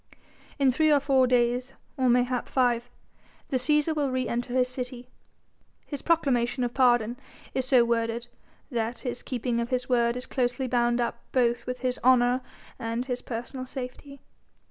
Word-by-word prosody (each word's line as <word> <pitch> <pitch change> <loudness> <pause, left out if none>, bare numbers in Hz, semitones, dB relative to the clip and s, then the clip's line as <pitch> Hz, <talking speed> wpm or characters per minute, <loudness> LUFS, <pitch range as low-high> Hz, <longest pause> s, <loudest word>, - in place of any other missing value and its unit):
In 275 -3 +4
three 310 +4 +3
or 290 - +5
four 270 -2 +3
days, 245 +1 +1 0.2
or 260 -2 +2
mayhap 245 0 +1
five, 245 -2 +1 0.6
the 265 - +1
Cæsar 300 +4 +2
will 290 -2 0
re 255 0 -1
enter 240 +1 -2
his 250 0 +2
city. 250 -1 -6 0.8
His 285 - -6
proclamation 260 -7 +1
of 240 -1 -2
pardon 240 -3 +3 0.4
is 260 -1 -1
so 250 -3 +5
worded 230 0 -1 0.5
that 230 0 -2
his 245 -2 -4
keeping 245 -2 -2
of 235 0 -2
his 250 -1 -1
word 235 -1 +2
is 250 - -5
closely 255 0 -1
bound 240 -1 +1
up 235 - -1
both 240 -2 +1
with 250 -1 -4
his 255 -1 -1
honour 250 0 +4 0.4
and 230 0 -2
with 260 - -7
his 250 0 -2
personal 250 +2 -6
safety. 265 +2 -8
250 Hz, 165 wpm, -27 LUFS, 240-260 Hz, 0.8 s, or